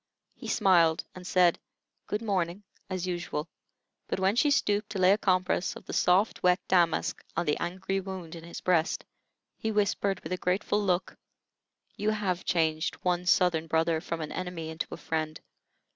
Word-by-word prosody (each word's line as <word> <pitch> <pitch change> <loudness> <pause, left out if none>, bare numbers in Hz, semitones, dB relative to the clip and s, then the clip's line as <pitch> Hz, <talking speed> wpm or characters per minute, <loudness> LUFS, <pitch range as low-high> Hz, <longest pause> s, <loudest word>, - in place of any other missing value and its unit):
He - - -10
smiled, 165 -4 +4
and 180 -1 -9
said, 180 -2 +4 0.5
"Good 210 +2 -2
morning," 190 -2 -1 0.3
as 185 -1 -2
usual, 175 -3 -3 0.6
but - - -2
when 190 +2 +2
she 270 +5 +4
stooped 210 -7 +1
to 205 - -4
lay 185 0 +5
a 200 - +5
compress 185 -2 +1
of - - -11
the - - -7
soft, 190 +5 +3
wet 180 0 +4
damask 170 -3 +2
on 170 - +1
the 150 - +2
angry 190 +2 -2
wound 185 -3 -7
in 165 -1 -9
his 170 - -8
breast, 175 -2 +1 0.5
he 220 - -1
whispered, 200 -2 +1
with 160 - -8
a - - -1
grateful 195 +3 0
look: 185 -2 0 0.8
"You 210 - 0
have 200 -4 -1
changed 160 -2 +1
one 180 0 0
'Southern 175 -4 +3
brother' 160 0 +1
from 165 -1 -4
an 155 - -5
enemy 180 -3 -4
into 160 +1 -4
a - - -6
friend. 155 -1 -3
180 Hz, 175 wpm, -29 LUFS, 165-195 Hz, 0.8 s, lay